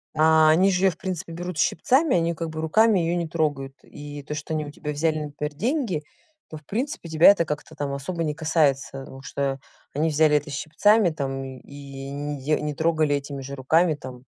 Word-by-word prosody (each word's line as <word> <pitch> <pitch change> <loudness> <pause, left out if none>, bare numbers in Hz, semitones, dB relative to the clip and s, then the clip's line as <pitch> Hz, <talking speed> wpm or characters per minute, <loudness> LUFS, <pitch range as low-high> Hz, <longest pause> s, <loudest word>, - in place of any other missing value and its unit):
А 155 0 +5
они 180 +5 +5
же 185 +1 +1
её 190 - +5
в 165 - -14
принципе 185 -2 -5
берут 175 0 -5
щипцами, 260 - +2
они 170 0 +1
как 165 0 -4
бы 155 0 -5
руками 215 +6 +4
её 170 0 0
не 170 -1 -2
трогают. 145 -4 -2
И 145 0 -9
то, 150 - -6
что 150 +1 -5
они 155 -1 -1
у - - -7
тебя 150 +1 -5
взяли, 155 +1 0
например, 150 0 -5
деньги, 220 - -1 0.5
то 155 - -6
в 150 - -17
принципе 240 - -3
тебя 160 +3 +7
это 200 -4 +1
как-то, 150 -1 -5
там, 145 -1 -3
особо 165 +5 -3
не 150 -2 -1
касается, 145 -4 0
ну, 135 - -11
что 135 -1 -2 0.4
они 155 +3 +1
взяли 150 0 +4
это 145 +1 -5
щипцами, 180 +8 +3
там, 135 -4 -4
и 135 +1 -9
не 145 0 -4
де 150 +2 +1
не 150 0 -2
трогали 160 -2 +2
этими 140 -1 -5
же 140 +1 -7
руками, 155 +5 +2
там. 130 -3 -10
155 Hz, 210 wpm, -24 LUFS, 145-170 Hz, 0.5 s, тебя